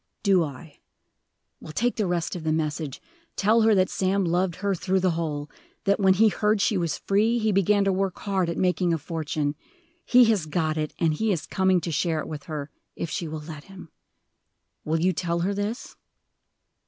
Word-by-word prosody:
"Do 195 -4 +4
I? 145 +1 -9 0.8
Well, - - -9
take 240 +8 0
the 210 -4 0
rest 175 -1 -1
of 175 - -6
the 160 - 0
message. 155 -2 -2 0.4
Tell 220 +3 +3
her 220 -1 +5
that 185 -1 +3
Sam 190 0 +1
loved 175 +1 0
her 200 +2 -1
through 190 +1 0
the 185 -1 +2
whole; 155 -3 -3 0.4
that, 200 +1 +2
when 190 -1 +4
he 220 +3 +5
heard 210 +1 +1
she 205 +1 +2
was 170 -4 -1
free, 215 +4 +1
he 220 -2 +1
began 200 +1 +3
to 195 -1 +2
work 190 -1 -1
hard 190 -4 -1
at 170 - -3
making 180 -2 +1
a - - -2
fortune. 155 -1 -3 0.5
He 250 0 +6
has 210 -8 +1
got 155 0 0
it; 155 -1 -2
and 160 -2 +2
he 220 +7 0
is 165 -6 -2
coming 190 -1 +2
to 170 - -4
share 160 +1 0
it - - -5
with 150 -3 -7
her, 150 -2 -5 0.2
if 165 - -4
she 175 -5 -3
will 155 0 -5
let 150 -1 -9
him. 195 -4 -12 0.9
Will 160 +1 0
you 185 +3 +2
tell 170 0 -1
her 195 +3 0
this?" 205 +4 -4
180 Hz, 205 wpm, -25 LUFS, 160-200 Hz, 0.9 s, He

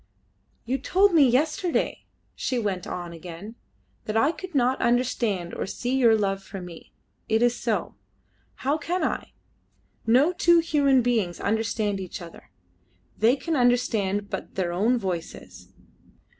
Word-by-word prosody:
"You 265 +3 -1
told 380 +8 +3
me 290 -6 +6
yesterday," 310 +7 0 0.3
she 255 - -2
went 200 -6 -2
on 175 -1 -5
again, 175 +5 -9 0.5
"that 215 +1 -1
I 275 +7 +4
could 370 -1 -9
not 255 0 +2
understand 235 -7 0
or - - -3
see 245 +6 -2
your 235 -4 +5
love 195 -2 -1
for 195 0 -8
me: 175 -2 -11 0.4
it 220 +1 +3
is 240 0 +3
so. - - -2 0.7
How 290 +3 +1
can 355 +4 -2
I? - - -2 0.7
No 265 +10 +4
two 345 -1 +4
human 285 -6 +3
beings 220 -8 0
understand 220 -2 -1
each 185 -2 -6
other. 170 -8 -12 0.7
They 230 +4 +4
can 325 +3 -3
understand 220 -6 +1
but - - -6
their 175 -2 -1
own 220 +8 +2
voices. 185 -6 -6
235 Hz, 145 wpm, -25 LUFS, 195-270 Hz, 0.7 s, me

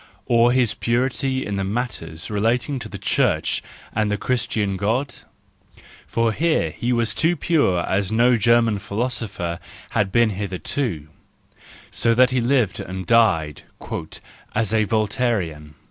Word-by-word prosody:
Or 120 0 +4
his 125 -4 +2
purity 130 +2 -1
in 100 -1 -3 0.2
matters 105 -9 -4
relating 120 +6 0
to 110 -2 -7
the 100 - -7
Church 100 0 +1 0.3
and 110 -1 0
the 105 - 0
Christian 110 -4 -1
God 115 +9 -1 0.5
?— - - -24
for 115 -1 +2
here 155 - +1
he 120 +9 -2
was 115 -3 +1
pure 160 - +2
as 95 +1 0
no 120 +3 +4
German 115 -1 +3
philosopher 100 -5 -3 0.3
had 100 -3 0
been 115 0 +3
hitherto, 95 - -3 0.8
so 115 -1 +2
that 130 +1 +5
he 130 -1 +1
lived 120 -5 +1
and 95 0 -6
died 90 -11 +2 0.5
" - - -13
as 110 -1 0
a 110 -1 +3
Voltairian." 100 - -1
110 Hz, 135 wpm, -22 LUFS, 100-120 Hz, 0.8 s, that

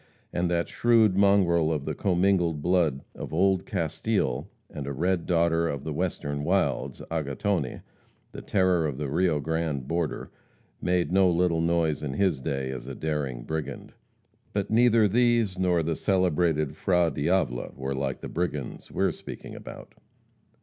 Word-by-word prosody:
And 90 0 0
that 85 -1 0
shrewd 115 -5 +3
mongrel 95 -5 +4
of 75 -3 -2
the - - -2
commingled 90 -4 +1
blood 85 -6 +2
of - - -7
old 95 +3 +2
Castile 85 - -1 0.2
and 70 -2 -7
a - - -2
red 85 +4 0
daughter 85 -1 +2
of 70 -4 -3
the 80 - -4
western 70 -4 -2
wilds, - - 0
Agatone, 80 0 -2 0.5
the - - -8
terror 90 -4 +2
of 70 -3 -4
the 70 -2 -3
Rio 85 -1 +2
Grande 80 -3 -2
border, 85 0 -2 0.5
made 90 -1 +1
no 95 0 +5
little 85 -1 +2
noise 85 -2 +1
in 70 -3 -3
his 90 -3 +1
day 65 0 -3
as 65 -1 -7
a 70 - -6
daring 70 -6 -3
brigand. 75 -1 -5 0.6
But 100 0 -2
neither 115 -1 +5
these 115 -3 +2
nor 90 -3 +2
the 80 +1 -1
celebrated 85 -6 +1
Fra 90 -2 +2
Diavola 70 -5 -1
were 65 +1 -3
like 65 -1 -3
the - - -5
brigands 75 -7 -4
we - - -1
are - - +3
speaking - - -9
about. - - -10
85 Hz, 155 wpm, -27 LUFS, 75-95 Hz, 0.6 s, no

